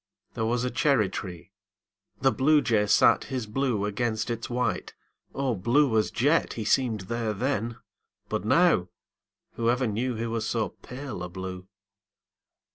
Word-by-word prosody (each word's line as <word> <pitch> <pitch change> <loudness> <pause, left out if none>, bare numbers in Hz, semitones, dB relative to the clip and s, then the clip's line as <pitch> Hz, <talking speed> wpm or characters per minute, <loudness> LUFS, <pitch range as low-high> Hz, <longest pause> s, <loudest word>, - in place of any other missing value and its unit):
There 110 -2 -1
was 120 +1 0
a 125 - -1
cherry 120 -5 +2
tree. 90 -1 -7 0.7
The 135 - +4
Bluejay 130 -7 +3
sat - - +4
His 130 -4 -3
blue 110 -2 -1
against 110 +2 -1
its 115 +2 -4
white 125 +1 -2 0.4
O 135 -2 0
blue 120 +5 +2
as 110 -1 +2
jet 145 +8 +1
He 110 - -5
seemed 115 -5 +1
there 110 +3 -2
then! 115 0 -2 0.5
But 110 -3 -2
now 165 - +3 0.7
Whoever 120 +2 +1
knew 120 +3 -1
He 115 +1 -3
was 115 -1 -2
so 115 -2 0
pale 130 -5 -8
a 90 - -5
blue! 95 +1 -7
115 Hz, 145 wpm, -27 LUFS, 105-130 Hz, 0.7 s, The